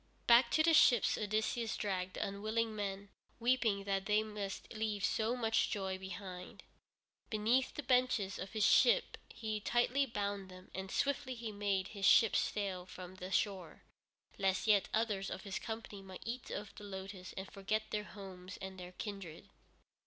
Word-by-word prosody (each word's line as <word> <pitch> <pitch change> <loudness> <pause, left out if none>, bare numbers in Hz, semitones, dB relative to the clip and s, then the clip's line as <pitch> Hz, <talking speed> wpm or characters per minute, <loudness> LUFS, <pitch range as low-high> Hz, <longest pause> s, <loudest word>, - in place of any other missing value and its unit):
Back 235 0 +7
to 315 - +5
the 330 0 +5
ships 245 -7 +6
Odysseus 220 +2 -1
dragged 185 -2 -2
the - - -1
unwilling 215 +3 -1
men, 200 -1 -4 0.3
weeping 230 -4 +2
that 195 -1 -1
they 210 +1 +3
must 210 -1 -5
leave 215 -2 -1
so 225 +2 +1
much 225 -2 +2
joy 190 -2 -2
behind. 185 -1 -8 0.7
Beneath 230 +5 +2
the 295 - -4
benches 250 -6 +2
of 190 +2 -6
his 215 -1 +2
ship 485 0 +5
he 215 -1 -3
tightly 245 +5 +2
bound 200 -4 -3
them, 185 0 -13
and 190 +1 -5
swiftly 260 +1 0
he 230 -2 -5
made 200 -2 -1
his 200 -2 0
ships 225 - +6
sail 190 -3 -2
from 185 0 -9
the 185 0 -6
shore, 190 -3 -1 0.6
lest 190 -1 +1
yet 210 -3 +4
others 210 -3 0
of - - -6
his 200 -2 -3
company 220 -3 -6
might 190 -1 -10
eat 240 +2 -4
of 210 -1 -5
the - - -11
lotus 190 -1 -7
and 190 0 -6
forget 215 +2 -2
their 210 0 -1
homes 185 -2 -9
and 190 -1 -7
their 180 0 -8
kindred. 195 -5 -7
205 Hz, 165 wpm, -35 LUFS, 190-225 Hz, 0.7 s, Back